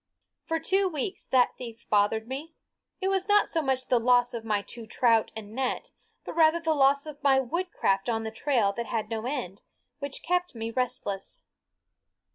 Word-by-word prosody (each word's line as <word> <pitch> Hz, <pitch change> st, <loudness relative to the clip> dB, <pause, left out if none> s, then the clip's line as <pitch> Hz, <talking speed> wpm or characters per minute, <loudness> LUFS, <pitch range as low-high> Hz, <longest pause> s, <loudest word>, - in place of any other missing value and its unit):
For 325 Hz, 0 st, -1 dB
two 380 Hz, +4 st, +2 dB
weeks 360 Hz, +5 st, -4 dB
that 250 Hz, -2 st, +3 dB
theft 235 Hz, -1 st, -9 dB
bothered 215 Hz, +2 st, +2 dB
me. 290 Hz, +6 st, -6 dB, 0.5 s
It 380 Hz, -, +1 dB
was 385 Hz, 0 st, 0 dB
not 415 Hz, 0 st, +4 dB
so 325 Hz, -, 0 dB
much 265 Hz, -3 st, -1 dB
the 250 Hz, -2 st, +3 dB
loss 245 Hz, +1 st, +3 dB
of 230 Hz, -2 st, -4 dB
my 210 Hz, -2 st, 0 dB
two 225 Hz, +2 st, -10 dB
trout 230 Hz, -1 st, +3 dB
and 215 Hz, -1 st, -8 dB
net, 260 Hz, +1 st, -2 dB, 0.3 s
but -, -, -5 dB
rather 320 Hz, 0 st, +4 dB
the 325 Hz, -1 st, +1 dB
loss 280 Hz, 0 st, +3 dB
of 300 Hz, -2 st, -9 dB
my 270 Hz, -1 st, +4 dB
woodcraft 265 Hz, -, -1 dB
on 225 Hz, -1 st, 0 dB
the 220 Hz, -, -4 dB
trail 225 Hz, -4 st, +1 dB
that 235 Hz, -1 st, -3 dB
had 220 Hz, 0 st, -3 dB
no 225 Hz, +1 st, -2 dB
end, 240 Hz, -9 st, -4 dB, 0.4 s
which 280 Hz, -1 st, -5 dB
kept 360 Hz, -3 st, 0 dB
me 225 Hz, 0 st, -4 dB
restless. 225 Hz, -5 st, -3 dB
255 Hz, 185 wpm, -28 LUFS, 225-315 Hz, 0.5 s, not